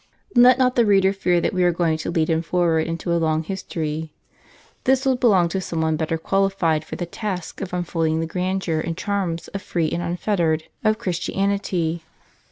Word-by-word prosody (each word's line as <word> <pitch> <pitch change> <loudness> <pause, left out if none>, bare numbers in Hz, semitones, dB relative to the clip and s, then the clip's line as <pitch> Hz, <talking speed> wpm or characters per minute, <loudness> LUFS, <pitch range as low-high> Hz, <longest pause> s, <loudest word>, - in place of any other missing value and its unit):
Let 245 +1 +7
not 255 -1 +2
the 240 - +5
reader 195 -2 +4
fear 180 -3 +1
that - - -1
we 185 -1 +1
are 175 - +4
going 165 -2 0
to - - -4
lead 165 -2 +1
him 160 -1 +1
forward 165 -1 +1
into 170 +1 -2
a 170 - +2
long 160 0 +1
his 190 +3 -5
tory. 155 -2 -4 0.7
This 265 +1 +3
will 265 -1 +3
belong 205 -9 +4
to 190 +2 -2
some 165 -3 -3
one 160 0 +1
better 160 +1 -1
qualified, 185 -3 +1
for - - -7
the 175 - -3
task 185 0 -5
of 190 - -5
unfolding 165 -3 -1
the 165 - -1
grandeur 180 -1 -1
and 165 +1 -3
charms 190 -5 -2
of 195 - -5
free 165 -4 -1
and 175 - -1
unfettered 170 -2 0 0.2
of 215 0 +3
Christianity. 180 -3 -1
175 Hz, 195 wpm, -22 LUFS, 160-195 Hz, 0.7 s, Let